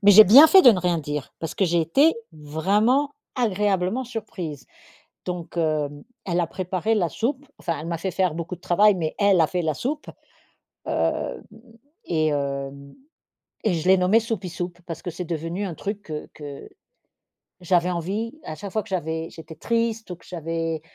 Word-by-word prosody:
Mais 205 - +7
j'ai 215 +2 +10
bien 265 +11 +10
fait 380 +3 +7
de 245 - +10
ne 190 - +1
rien 175 -1 +1
dire 150 -1 -5
parce 165 - -5
que 195 - +2
j'ai 170 -1 +2
été 275 - +4 0.2
vraiment 205 - +1 0.2
agréablement 210 0 0
surprise. 185 - -6 0.6
Donc 175 -1 -6
hem, 150 -3 -1 0.2
elle 175 -1 0
a 170 - 0
préparé 185 +5 -1
la 185 -6 +1
soupe, 270 - -2
enfin 170 -4 -3
elle 155 - -7
m'a 170 -1 -3
fait 190 +3 -2
faire 180 -2 0
beaucoup 170 +2 -4
de - - -29
travail, 205 +5 +4
mais 165 -4 -2
elle 200 -4 +4
a 160 - +5
fait 180 +1 -2
la 155 -1 0
soupe. 295 - -4 0.8
Hem, - - -1 0.6
et 155 -2 +1
hem, 140 -1 -3 0.7
et 215 -5 +1
je 165 +2 -2
l'ai 190 - +7
nommée 185 +5 +4
«soupie 220 -5 -3
soupe» 175 +1 -6
parce 165 -2 -6
que 175 - -4
c'est 175 +2 -6
devenu 165 +4 -3
un 180 -4 -4
truc, 205 0 -6
heu, 150 -1 -5
que 145 -2 -9 0.9
j'avais 180 0 +2
envie 195 +7 -3
à 155 - -6
chaque 190 +5 -8
fois 215 - 0
que 220 - -15
j'avais 160 -3 -2
j'étais 160 0 -11
triste 225 +3 -1
ou 180 - -4
que - - -22
j'avais, 165 -2 -3
180 Hz, 185 wpm, -24 LUFS, 160-205 Hz, 0.9 s, j'ai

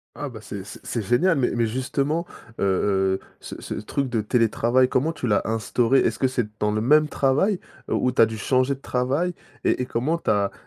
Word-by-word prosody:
Ah, 145 -1 -5
bah, 110 -4 -10
c'est 100 -2 -7
c'est 100 - -12
c'est 115 - -2
génial, 140 - +2
mais 125 - +2
mais, 115 -1 +2
justement, 140 +7 -1 0.3
heu - - 0
heu, 95 0 +1 0.2
ce - - -9
ce - - -6
truc 135 +5 -3
de 115 -3 0
télétravail, 120 +3 +2
comment 135 +5 +1
tu 155 - -5
l'as 105 -4 +2
instauré? 115 +4 +2
Est-ce - - 0
que 130 - +3
c'est 130 -3 -1
dans 105 0 +1
le 110 0 0
même 150 +5 +4
travail, 150 +9 +1 0.3
heu, - - +1
ou 125 - +1
tu 125 - +2
as 115 - +7
dû 110 0 -6
changer 130 +5 +1
de - - -18
travail? 135 +8 -1 0.3
Et - - +1
et 125 - -3
comment 150 +9 -1
tu - - -3
as 100 -1 +2
125 Hz, 225 wpm, -24 LUFS, 110-140 Hz, 0.3 s, as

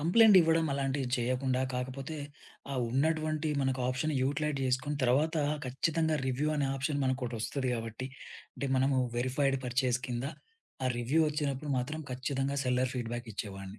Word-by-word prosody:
Complaint 200 +6 +7
ఇవ్వడం 165 -1 +3
అలాంటివి 135 -1 -1
చేయకుండా, 130 +1 0
కాకపోతే 130 +4 -4 0.6
ఆ - - -2 0.2
ఉన్నటువంటి 155 +3 +1
మనకు 130 -1 0
ఆప్షన్ 130 +5 0
యుటిలైజ్ 145 +2 0
చేసుకొని 130 +3 0
తర్వాత 145 +6 +3 0.3
ఖచ్చితంగా 160 +4 +1
రివ్యూ 135 +4 0
అనే 140 - +1
ఆప్షన్ 140 +2 -1
మనకొటొస్తది 130 0 -1
గాబట్టి 115 +2 -4 0.5
అంటే 140 - -3
మనము 130 0 +3 0.2
వెరిఫైడ్ 135 +2 +1
పర్చేజ్ 125 0 +1
కింద 120 +1 -3 0.6
ఆ - - +3
రివ్యూ 130 +7 +2
ఒచ్చినప్పుడు 145 -1 -2
మాత్రం 150 +6 -3
ఖచ్చితంగా 135 +2 -1
సెల్లర్ 125 0 +1
ఫీడ్‌బ్యాక్ 120 -1 -4
ఇచ్చేవాడ్ని. 95 0 -6
135 Hz, 135 wpm, -31 LUFS, 125-150 Hz, 0.6 s, Complaint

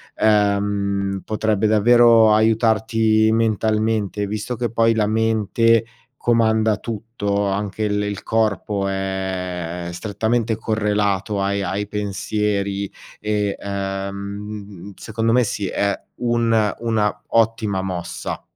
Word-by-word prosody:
ehm, 100 -2 +1
potrebbe 110 -1 0
davvero 115 0 +6
aiutarti 110 0 +3
mentalmente; 110 -2 0
visto 105 +4 -4
che 120 -1 -2
poi 115 0 +3
la 105 -2 +1
mente 110 +1 +2 0.3
comanda 110 -3 +2
tutto, 105 -2 -3
anche 100 +2 -2
il 105 -1 0
il 100 -1 -4
corpo 105 -2 0
è 90 -3 -3
è - - -6
strettamente 110 +4 -1
correlato 105 -2 0
ai 100 +1 0
ai 100 +2 -2
pensieri 100 -1 -2 0.3
e, 105 -1 -1
ehm, 100 0 -5
secondo 115 +1 -2
me 125 0 +4
sì, 100 -2 -2
è 100 +1 0 0.3
un 115 -3 +2
una 105 -3 0
ottima 110 -4 +1
mossa. 90 -3 -5
105 Hz, 105 wpm, -21 LUFS, 100-110 Hz, 0.3 s, davvero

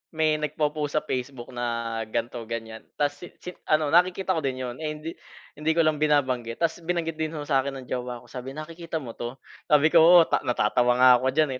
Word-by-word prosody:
may 155 -1 +2
nagpo-post 150 0 -2
sa 150 - +1
Facebook 130 -3 -5
na 115 -2 -3
ganito, 115 +2 -3
ganiyan. 115 -1 -6
'Tas 145 0 -1
si 175 - -9 0.2
si 180 - -5 0.2
ano, 155 -1 +2
nakikita 185 +2 +3
ko 165 - +1
din 135 -4 -2
'yon, 120 -1 -5
eh, 155 -1 -3
hindi 155 +2 -6 0.5
hindi 155 +1 +1
ko 165 - +4
lang 155 -1 +1
binabanggit 130 -6 +1
'tas 165 +1 0
binanggit 165 -2 -2
din 160 0 -2
ho 150 - -4
sa 140 -2 +2
akin 140 0 -4
ng - - -17
jowa 125 -1 -4
ko. - - -19
Sabi, 130 +2 -7
"Nakikita 165 +1 -6
mo 115 -3 -8
'to?" 120 +2 -5 0.3
Sabi 150 +1 +4
ko, 170 - +7
"Oo, 170 +1 +8
ta - - +1
natatawa 120 +1 +2
nga 130 +1 +6
ako 130 - -1
diyan, 155 -2 +3
145 Hz, 215 wpm, -25 LUFS, 125-160 Hz, 0.5 s, Oo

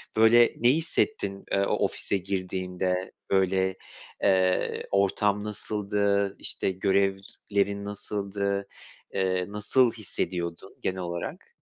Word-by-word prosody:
Böyle 115 +2 +6
ne 120 - +4
hissettin, 150 - 0
eee, - - +2
o - - 0
ofise 100 - -1
girdiğinde, 90 -1 -2 0.2
böyle, 95 0 +2 0.5
eee, 95 -2 +2
ortam 100 +1 +2
nasıldı? 100 -1 0
İşte - - -1
görevlerin 100 +1 0
nasıldı? 100 -1 -3 0.5
Eee, 95 -1 +1
nasıl 115 +4 +3
hissediyordun 90 -4 -4
genel 95 0 -1
olarak? 85 -1 -5
100 Hz, 100 wpm, -27 LUFS, 95-105 Hz, 0.5 s, Böyle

